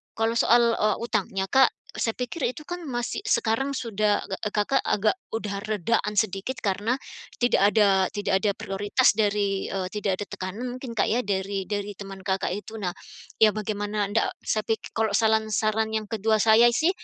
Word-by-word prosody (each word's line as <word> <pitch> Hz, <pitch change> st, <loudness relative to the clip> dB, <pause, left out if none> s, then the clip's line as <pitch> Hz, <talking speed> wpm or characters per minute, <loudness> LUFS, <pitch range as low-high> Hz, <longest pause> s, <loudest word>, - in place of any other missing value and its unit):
kalau 225 Hz, +1 st, +1 dB
soal, 235 Hz, 0 st, +5 dB
eee, 215 Hz, 0 st, +2 dB
utangnya, 205 Hz, -4 st, -1 dB
Kak, 265 Hz, -1 st, +6 dB, 0.3 s
e -, -, -8 dB
saya 225 Hz, -, 0 dB
pikir 250 Hz, +3 st, -2 dB
itu 280 Hz, -, -11 dB
kan 350 Hz, 0 st, -5 dB
masih 245 Hz, -, -3 dB
sekarang 270 Hz, -, +1 dB
sudah 215 Hz, -5 st, 0 dB
ge 195 Hz, -, -3 dB
e 210 Hz, -, -2 dB
Kakak 210 Hz, +6 st, +2 dB
agak 215 Hz, +1 st, +2 dB, 0.2 s
udah 205 Hz, -3 st, -3 dB
redaan 210 Hz, +1 st, 0 dB
sedikit, 200 Hz, +5 st, -2 dB
karena 205 Hz, +4 st, 0 dB, 0.4 s
tidak 245 Hz, -4 st, +3 dB
ada 195 Hz, -3 st, +4 dB
tidak 200 Hz, -2 st, 0 dB
ada 210 Hz, -, +3 dB
prioritas 205 Hz, +6 st, +2 dB
dari, 205 Hz, -2 st, 0 dB
eee, 190 Hz, -2 st, -2 dB
tidak 200 Hz, -3 st, -1 dB
ada -, -, -2 dB
tekanan 190 Hz, +6 st, -5 dB
mungkin, 255 Hz, -2 st, -7 dB
Kak, -, -, +3 dB
ya, 235 Hz, -, +2 dB
dari 195 Hz, -1 st, -2 dB
dari 205 Hz, -1 st, -2 dB
teman 195 Hz, 0 st, -9 dB
Kakak 190 Hz, -1 st, 0 dB
itu. 210 Hz, +2 st, -8 dB
Nah, 180 Hz, -3 st, -2 dB, 0.5 s
ya 220 Hz, -, +7 dB
bagaimana 205 Hz, -1 st, -2 dB
ndak 225 Hz, -, +2 dB, 0.2 s
saya 215 Hz, -1 st, -1 dB
pik 225 Hz, -1 st, -2 dB
kalau 220 Hz, -1 st, +1 dB
salan 220 Hz, 0 st, +2 dB
saran 220 Hz, +1 st, +1 dB
yang 215 Hz, -1 st, -2 dB
kedua 220 Hz, 0 st, +1 dB
saya 225 Hz, +2 st, +6 dB
sih 320 Hz, +7 st, +3 dB
215 Hz, 185 wpm, -25 LUFS, 200-230 Hz, 0.5 s, ya